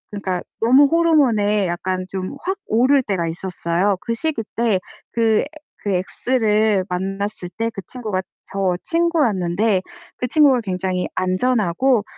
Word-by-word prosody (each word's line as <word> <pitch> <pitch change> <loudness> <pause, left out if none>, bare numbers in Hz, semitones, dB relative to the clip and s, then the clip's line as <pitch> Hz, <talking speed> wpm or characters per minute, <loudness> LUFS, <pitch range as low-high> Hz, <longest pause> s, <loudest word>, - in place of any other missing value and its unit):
그니까 185 -3 -2 0.2
너무 260 +5 +6
호르몬에 250 - +3
약간 185 +1 -2
좀 190 +7 -4
확 380 +2 -2
오를 260 +5 +4
때가 185 -6 -1
있었어요. 180 +2 -1
그 230 - -2
시기 290 -4 -2
때 225 -5 +2 0.3
그 225 -2 +2
에 - - -5 0.4
그 200 - 0
엑스를 210 0 +1
만났을 195 0 -2
때 225 0 0
그 200 -3 -7
친구가 215 -7 -3 0.2
저 190 -2 -1
친구였는데 220 - +1 0.4
그 250 - -2
친구가 275 -3 +4
굉장히 185 -2 -2
안전하고 210 +4 +1
210 Hz, 275 characters per minute, -20 LUFS, 185-250 Hz, 0.4 s, 너무